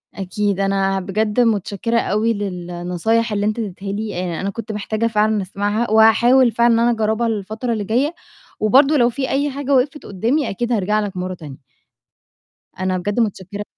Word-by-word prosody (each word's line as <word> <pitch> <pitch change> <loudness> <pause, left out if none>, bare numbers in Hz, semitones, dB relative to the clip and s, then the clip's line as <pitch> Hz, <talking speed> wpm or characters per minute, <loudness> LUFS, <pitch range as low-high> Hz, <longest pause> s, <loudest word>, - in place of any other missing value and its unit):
أكيد، 200 +1 -2
أنا 195 0 +1
بجد 210 +4 -1
متشكّرة 225 0 +1
أوي 220 +2 +1
للنصايح 180 +3 -2
اللي 205 0 0
أنت 215 +2 -1
ادّيتها 195 -2 -5
لي، 210 0 -4 0.2
آآ - - -4
أنا 195 - -2
كنت 220 +2 -6
محتاجة 215 +2 -2
فعلًا 215 -1 +1
أسمعها، 205 +4 -2
وهاحاول 235 +3 +5
فعلًا 235 +1 +3
إن 230 - +3
أنا 240 +1 +3
أجرّبها 220 +1 0
الفترة 220 +3 -3
اللي 215 - -2
جايّة، 255 - 0 0.5
وبرضه 275 +8 +4
لو 240 -2 +4
في 265 +2 -3
أي 285 +2 0
حاجة 280 0 -2
وقفت 275 +3 0
قُدّامي 235 +10 -1
أكيد 240 +5 -3
هارجع 210 -1 +1
لك 205 -3 -4
مرّة 185 +1 -3
تانية. 150 -6 -10 1.2
أنا 185 0 0
بجد 205 +5 -2
متشكّرة 205 -2 -2
215 Hz, 170 wpm, -19 LUFS, 195-235 Hz, 1.2 s, وهاحاول